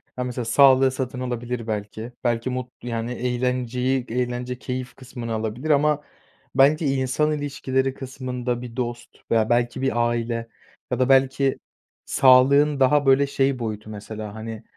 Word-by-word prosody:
Ha, 125 - -2
mesela 125 -1 -4
sağlığı 135 +2 +5
satın 130 -1 -4
alabilir 120 -2 -4
belki. 110 +2 -4
Belki 120 0 0
mut 125 -1 -4
yani, 115 0 -3
eğlenceyi 125 +1 -1
Eğlence, 125 +1 -2
keyif 125 0 -5
kısmını 120 -3 -7
alabilir 110 +7 -3
ama 150 0 +3 0.5
bence 145 +4 +4
insan 135 +2 +1
ilişkileri 135 -2 -1
kısmında, 125 -2 -4
bir 120 -2 -8
dost 120 -1 -5
veya 110 -1 +3
belki 120 +2 +1
bir 120 -3 +1
aile 115 0 -3 0.4
ya - - -1
da 130 +1 +2
belki 135 0 +3 0.5
sağlığın 140 +3 +5
daha, 145 +2 +4
böyle, 135 +1 +4
şey 135 -1 0
boyutu 110 -2 -5
mesela, 105 0 -7
hani, 110 0 -7
125 Hz, 140 wpm, -23 LUFS, 120-135 Hz, 0.5 s, sağlığı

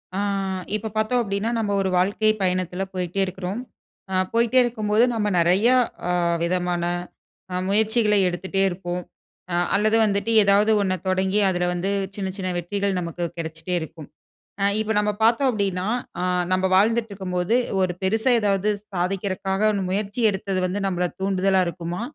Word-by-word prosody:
ஆ - - -1 0.6
இப்போ 215 +1 -3
பார்த்தோம் 220 +3 +1
அப்பிடீன்னா, 200 0 -2
நம்ம 210 -2 -1
ஒரு 190 - 0
வாழ்க்கை 205 +4 +2
பயணத்துல 185 0 -1
போயிட்டே 180 0 -3
இருக்கிறோம். 190 +4 -5 0.5
அ - - -1 0.2
போயிட்டே 235 +2 +3
இருக்கும்போது, 220 -2 +1
நம்ம 215 -2 0
நெறையா 190 +9 +4 0.3
அ - - +2 0.3
விதமான 175 0 0 0.7
அ - - -1
முயற்சிகளை 215 0 +3
எடுத்துட்டே 190 +2 -2
இருப்போம். 175 0 -4 0.5
அ - - +1 0.2
அல்லது 215 +2 +3
வந்துட்டு, 200 +2 0
ஏதாவது 200 +2 +4
ஒண்ண 190 -2 0
தொடங்கி, 190 +2 +1
அதுல 180 -1 0
வந்து 180 +3 -1 0.2
சின்ன 195 -2 -3
சின்ன 185 -2 -3
வெற்றிகள் 200 +2 -2
நமக்கு 175 0 -4
கிடைச்சிட்டே 160 +2 -4
இருக்கும். 160 -1 -9 0.5
அ - - +2 0.2
இப்போ 220 0 -1
நம்ப 210 0 +1
பார்த்தோம் 235 +4 +4
அப்பிடீன்னா, 195 -5 -1 0.3
அ - - -1 0.3
நம்ப 185 0 +1
வாழ்ந்துட்டுருக்கும்போது, 200 -2 +1 0.3
ஒரு 185 -1 +1
பெருசா 220 +6 +2
ஏதாவது 200 0 +1 0.3
சாதிக்கிறக்காக 190 +3 0 0.2
முயற்சி 205 +4 -2
எடுத்தது 190 -1 -2
வந்து, 195 +3 -3
நம்மள 180 -1 0
தூண்டுதலா 190 0 +2
இருக்குமா? 170 +2 -5
195 Hz, 145 wpm, -23 LUFS, 180-210 Hz, 0.7 s, நெறையா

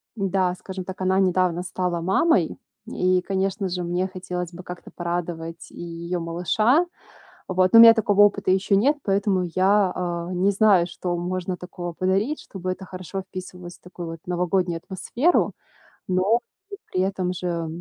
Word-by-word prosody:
да, 190 -3 0
скажем 185 0 -7
так, 190 0 -8
она 185 +1 +2
недавно 180 -2 +2
стала 180 -2 -2
мамой, 195 - +2 0.3
и, 185 0 +1
конечно 195 +1 -1
же, 180 0 -3
мне 175 +2 -1
хотелось 180 -2 -5
бы 180 +1 -9
как-то 180 0 -9
порадовать 170 -1 -4
и - - -10
её 170 +1 -4
малыша. 215 - +2 0.6
Вот, 185 +1 +2
ну, 230 - +10
у - - +12
меня 230 0 +11
такого 205 -2 +2
опыта 200 -2 +3
ещё 190 +2 +2
нет, 280 +8 +3
поэтому 195 -1 +1
я, 195 0 +3
а, 175 -1 -3
не 185 +3 +2
знаю, 195 -4 +4
что 175 0 -3
можно 180 +1 -3
такого 175 -1 -7
подарить, 195 - 0
чтобы 185 -1 -5
это 190 +1 -6
хорошо 185 +1 -6
вписывалось 180 -2 -9
в - - -40
такую 175 -1 -8
вот 165 - -7
новогоднюю 180 -1 0
атмосферу. 235 - +1 0.6
Но 190 +6 +3 0.3
и - - -4 0.2
при 185 - 0
этом 185 -1 -1
же 170 -2 -3
185 Hz, 165 wpm, -24 LUFS, 175-195 Hz, 0.6 s, у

